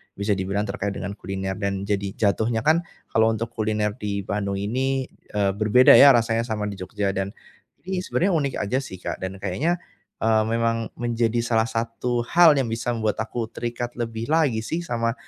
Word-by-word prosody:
bisa 100 +1 -1
dibilang 100 +1 0
terkait 100 -1 -3
dengan 100 - -4
kuliner, 95 0 -5
dan 100 -1 -2
jadi 100 -1 -1
jatuhnya 110 +2 +1
kan 160 +4 +4 0.3
kalau 110 0 +4
untuk 115 +1 -4
kuliner 105 -2 -1
di 100 -1 -3
Bandung 100 0 -2
ini, 130 +6 -1 0.2
eee, 100 -1 +2
berbeda 110 +4 +6
ya 140 -2 +9
rasanya 115 0 +1
sama 105 -2 -2
di 100 - -9
Jogja. 100 +1 -2
Dan 95 +2 -3 0.5
ini 185 0 -2
sebenarnya 185 +1 0
unik 140 -4 0
aja 125 +6 0
sih, 95 - -8
Kak, - - -5
dan 95 +1 -5
kayaknya, 140 - -1 0.4
eee, 110 -1 +3
memang 115 0 0
menjadi 120 -1 0
salah 115 -1 +1
satu 115 +1 -2
hal 175 -1 +7
yang 130 - +1
bisa 115 +2 -2
membuat 110 -2 -1
aku 115 0 -4
terikat 120 +1 -5
lebih 115 -1 -4
lagi 150 -7 +2
sih 165 +7 -2
sama, 115 -5 -1
115 Hz, 180 wpm, -24 LUFS, 100-120 Hz, 0.5 s, ya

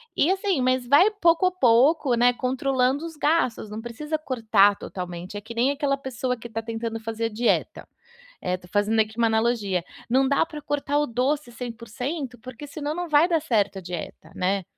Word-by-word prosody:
E, 330 - +3
assim, 385 -6 0
mas 255 -1 +1
vai 300 - +6
pouco 340 -4 +3
a 365 - +3
pouco, 265 -2 +4
né, 245 +1 +4
controlando 260 +3 0
os 330 -1 -8
gastos, 295 -8 0
não 210 +1 -6
precisa 300 +7 -4
cortar 220 -8 +3
totalmente, 180 0 -7
é - - -6
que 220 +3 -9
nem 240 +3 +2
aquela 285 -1 0
pessoa 260 -2 -3
que 235 0 -10
tá 225 0 -4
tentando 225 0 -4
fazer 225 0 -3
dieta, 230 +2 -1 0.5
eh, 180 0 -1
tô 180 0 -17
fazendo 210 +3 +2
aqui 220 0 -1
uma 230 - +4
analogia, 220 -5 +1 0.3
não 265 +3 +3
dá 280 +3 +2
para 305 -2 -9
cortar 290 0 -1
o 295 - +1
doce 255 +3 -1
100%, 245 +3 -5
porque 255 +4 -10
senão 295 +1 -4
não 350 +1 -4
vai 305 +1 +5
dar 335 -3 +1
certo 205 -9 +1
a - - -6
dieta, 175 -1 -7
né. 190 +1 0
245 Hz, 190 wpm, -24 LUFS, 220-290 Hz, 0.5 s, vai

